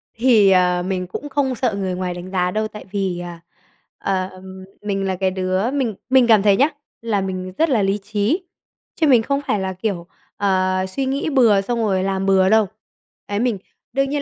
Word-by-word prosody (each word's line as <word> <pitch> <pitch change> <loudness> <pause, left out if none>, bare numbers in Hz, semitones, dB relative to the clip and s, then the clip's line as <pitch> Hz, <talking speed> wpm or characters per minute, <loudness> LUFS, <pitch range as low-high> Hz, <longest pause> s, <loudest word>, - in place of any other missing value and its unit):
Thì, 225 -4 +5
à, 180 -1 +3
mình 185 0 -3
cũng 290 +11 -6
không 270 -2 0
sợ 235 -3 0
người 190 -2 -2
ngoài 180 -1 -3
đánh 175 +1 -8
giá 180 -1 0
đâu 215 +2 -1
tại 210 0 -11
vì, 190 -3 -2
à, 175 -1 -8 0.6
ờ, 190 -1 -1 0.5
mình 195 -2 -2
là 190 -1 -1
cái 190 +1 0
đứa 185 +4 -1
mình 260 -7 -1
mình 260 -1 +5
cảm 220 -3 +6
thấy 200 -2 +4
nhá, 280 +4 +4 0.3
là 220 -4 0
mình 185 -1 -4
rất 325 - +2
là 240 -6 +2
lý 195 +1 +1
trí, 210 - -1 0.5
chứ 315 - +2
mình 250 -5 +6
không 280 +2 -1
phải 210 - +1
là 190 0 -2
kiểu, 185 -3 -3 0.3
ờ, 185 -1 +1
suy 265 +8 -2
nghĩ 275 +3 -1
bừa 230 -8 +4
xong 235 +4 -2
rồi 195 -4 +1
làm 195 0 -1
bừa 190 -1 +4
đâu. 220 -1 +4 0.6
Đấy 205 0 -2
mình 240 -3 +1 0.4
đương 275 0 +1
nhiên 290 0 -1
200 Hz, 205 wpm, -20 LUFS, 185-235 Hz, 0.6 s, cảm